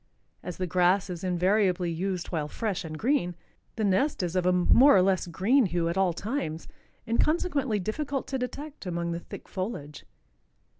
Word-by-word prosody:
As 180 - -7
the 185 - -1
grass 180 +2 +2
is 175 0 -6
invariably 185 0 +1
used 180 +1 -3
while 155 -4 -2
fresh 205 +3 -3
and 155 -1 -6
green, 215 - 0 0.4
the 220 - -2
nest 205 +4 +1
is 175 0 -3
of 180 -1 +1
a - - +5
more 200 +8 +6
or - - +6
less 185 -1 +1
green 210 +8 +2
hue 170 -1 0
at 170 - -2
all 190 -2 +2
times, 175 - -4 0.4
and 230 0 +1
consequently 290 -8 +1
difficult 270 +8 -3
to 265 - -2
detect 280 -1 -6
among 170 -1 -2
the 170 - -3
thick - - -10
foliage. 185 -7 -5
185 Hz, 180 wpm, -27 LUFS, 175-230 Hz, 0.4 s, more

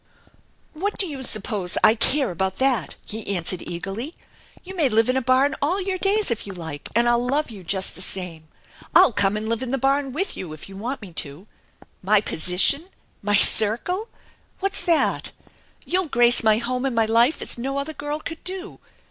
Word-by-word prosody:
" - - -32
" - - -39
What 395 +7 -3
do 390 - +1
you 285 -6 -6
suppose 210 -6 0
I 215 - +7
care 260 +2 +3
about 190 +2 -2
that? 260 -9 0
" - - -27
he 210 -2 -4
answered 175 +1 -3
eagerly. 200 - -6 0.2
" - - -27
You 380 +1 -9
may 310 -7 +2
live 225 +1 +2
in 255 - +1
a 265 - +1
barn 260 +3 +2
all 335 +8 +1
your 380 -1 -3
days 405 - +2
if 225 - -3
you 195 - -7
like, 160 -5 -8
and 235 +1 +3
I'll 240 0 +2
love 275 +2 -1
you 200 -4 -11
just 190 +2 -1
the - - -10
same. 180 -4 -6 0.5
I'll 245 - +7
come 200 0 +1
and 215 +1 -4
live 230 +1 -1
in 260 - -4
the 270 - 0
barn 275 +1 0
with 355 +9 -3
you 170 -4 -7
if 155 - -11
you 195 - -11
want 235 +5 -5
me 185 -4 -11
to. 145 +6 -11 0.6
My 210 +3 +3
position! 190 - +1 0.4
My 205 0 +2
circle! 235 - +5 0.5
What's 390 0 -1
that? 335 -2 +1 0.5
You'll 370 -1 0
grace 240 -3 +3
my 215 -1 +4
home 250 +2 -2
and 265 -3 -1
my 225 -1 +3
life 235 +6 +3
as - - -3
no 270 +3 -3
other 280 +3 -3
girl 295 0 -4
could 325 +1 -8
do. 375 +1 -4
240 Hz, 210 wpm, -23 LUFS, 200-290 Hz, 0.6 s, I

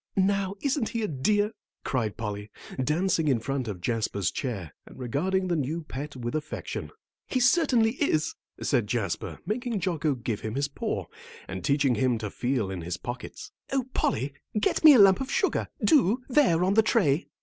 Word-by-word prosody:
"Now, 195 0 +1
isn't 275 -4 0
he 230 -1 -2
a - - 0
dear?" 205 +9 +1 0.3
cried 115 -6 -1
Polly, 105 -1 -4 0.3
dancing 165 +2 +1
in 130 -5 +3
front 130 +1 -3
of 95 -5 -5
Jasper's 110 -3 -1
chair, 100 - -4
and - - -13
regarding 180 +10 0
the 175 - +1
new 155 +3 -2
pet 145 0 -6
with 120 -2 -4
affection. 150 -1 -4 0.4
"He 255 - 0
certainly 245 -4 +4
is," 155 - +1 0.3
said 120 -7 +1
Jasper, 105 -5 -2
making 235 0 -2
Jocko 160 -5 0
give 115 -3 -3
him 110 +1 -5
his 140 +1 0
paw, - - -3 0.4
then 95 0 -5
teaching 140 - +2
him 125 -1 +1
to 105 -3 -5
feel 120 -6 -1
in 95 -2 -4
his 85 +1 -4
pockets. 125 +2 -7 0.2
"Oh, 270 -2 +1
Polly, 135 +5 0 0.3
get 210 - +1
me 305 -3 +10
a - - +6
lump 195 +3 +7
of 265 - -4
sugar, 420 -5 +1 0.2
do; 255 - +4
there 245 - +3
on 190 +2 +2
the 220 - +6
tray." 180 - +2
150 Hz, 180 wpm, -27 LUFS, -, 0.4 s, me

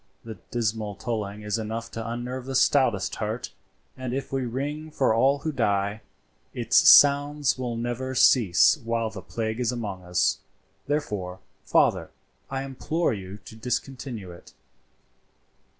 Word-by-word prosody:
The 110 -2 -8
dismal 110 -3 -2
tolling 105 -2 -4
is 105 +1 -1
enough 115 +2 -5
to 115 0 -5
unnerve 125 +2 -5
the 135 - -3
stoutest 120 -8 +2
heart, 110 +3 -4 0.4
and 130 -1 -4
if 135 0 -5
we 130 -2 -1
ring 145 +6 -4
for 135 -6 +1
all 135 +5 +3
who 155 +2 -3
die, 100 -4 0 0.5
its - - +5
sounds 145 0 +6
will 120 -2 -3
never 120 +3 -3
cease 115 - +5
while 115 -1 -1
the 95 -2 -8
plague 110 +2 -4
is 120 -1 +1
among 105 -6 -5
us; 90 0 +1 0.5
therefore, 105 -11 -2 0.3
father, - - +2 0.4
I 135 0 -3
implore 140 +3 -1
you 95 -1 -7
to 115 -1 -11
discontinue 125 -3 -4
it. 85 - -14
115 Hz, 140 wpm, -26 LUFS, 105-135 Hz, 0.5 s, sounds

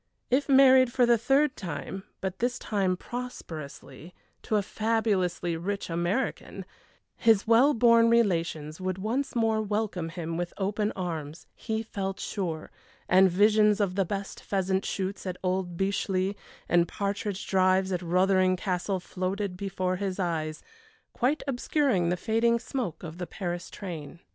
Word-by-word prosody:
If 280 +3 +2
married 265 -2 +7
for 250 0 +3
the 240 0 +5
third 275 +4 +2
time 190 +3 -6 0.2
but 190 -1 -4
this 245 +2 0
time 190 -6 0
prosperously, 165 - -8 0.3
to 215 - -1
a 205 - +2
fabulously 200 -6 0
rich 195 +2 -3
American 175 +9 -2 0.5
his 220 -3 +3
well 245 +6 +5
born 230 0 +5
relations 170 -8 +1
would 185 0 -2
once 235 +9 -2
more 225 -2 +2
welcome 205 -5 -2
him 165 -1 -4
with 175 0 -4
open 205 +2 -1
arms, 165 -4 -5
he 220 -1 -3
felt 195 -3 -4
sure, 170 -6 -4 0.4
and 190 +1 +6
visions 210 +3 +4
of 200 -3 +1
the 195 +1 +2
best 195 +2 -5
pheasant 190 -1 -1
shoots 195 0 -3
at 185 -1 -3
old 185 -2 -1
Beechleigh, 195 0 0 0.3
and 175 0 +3
partridge 200 0 -3
drives 190 0 +2
at 180 -1 -1
Rothering 185 +1 +3
Castle 185 +1 -1
floated 185 +2 -3
before 185 -1 -2
his 195 -1 -3
eyes, 160 -3 -2 0.5
quite 265 +5 0
obscuring 250 - +1
the 180 - 0
fading 230 +4 +2
smoke 230 - -4
of 165 +1 -8
the 180 - -4
Paris 175 -1 -4
train. 170 -4 -7
195 Hz, 145 wpm, -28 LUFS, 180-220 Hz, 0.5 s, married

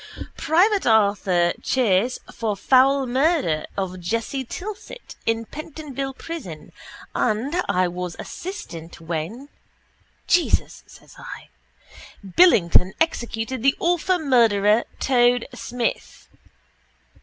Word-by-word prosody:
—... - - -19
private 375 - +3
Arthur 200 -5 +3
Chace 240 -1 +1 0.2
for 220 -3 -2
fowl 270 +5 +4
murder 260 - +1
of 185 -2 -3
Jessie 230 +9 -2
Tilsit 415 - -8
in 225 0 0
Pentonville 280 -2 -6
prison 250 - -8 0.4
and 255 +11 0
i 185 -2 +2
was 180 0 -5
assistant 175 - -8
when... 170 - -5 0.8
—Jesus, 350 -1 +1
says - - -17
I. - - -10 0.8
—_... 190 - -12
Billington 190 - +5
executed 240 -5 -1
the 270 +2 +3
awful 355 +2 +1
murderer 230 - +3
Toad 245 -2 +3
Smith... 245 -1 -4
240 Hz, 100 wpm, -23 LUFS, 195-285 Hz, 0.8 s, Billington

